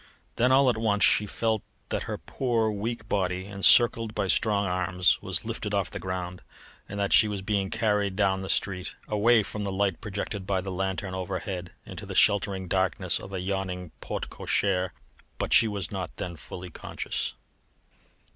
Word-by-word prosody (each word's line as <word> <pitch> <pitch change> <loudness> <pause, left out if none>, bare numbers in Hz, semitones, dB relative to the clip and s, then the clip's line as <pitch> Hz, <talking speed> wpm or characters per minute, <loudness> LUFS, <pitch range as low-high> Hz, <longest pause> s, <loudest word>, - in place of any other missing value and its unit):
Then 125 +2 +4
all 135 +1 +6
at 120 -3 +3
once 105 -2 +2
she 105 - +5
felt 110 +1 0 0.3
that - - -1
her - - -2
poor, 115 -4 0
weak 110 +2 -4
body, 95 -3 0
encircled 105 +3 +4
by 95 - -1
strong 105 -1 +2
arms, 90 -1 +2
was - - -3
lifted - - -3
off - - 0
the - - -5
ground, 90 -1 -4 0.5
and 100 - -5
that 100 0 +1
she 110 - +7
was 100 -2 -4
being 100 -2 0
carried 105 -3 +1
down 95 -1 +2
the 95 - -6
street, 90 -2 -1
away 110 +2 +4
from 105 +1 -5
the 100 - -2
light 95 -2 0
projected 100 -1 -4
by 95 -2 +1
the 95 +1 -5
lanthorn 95 0 -2
overhead, 95 -1 -4
into - - -8
the - - -6
sheltering 100 -2 +3
darkness 95 +1 0
of 95 - -10
a 95 -2 -3
yawning 90 -2 -3
porte - - -4
cochere. 95 -2 +1 0.5
But - - -1
she 115 - +7
was 100 -5 -3
not 95 -4 -5
then 85 -1 -4
fully 90 +4 -9
conscious. - - -4
100 Hz, 175 wpm, -27 LUFS, 95-105 Hz, 0.5 s, she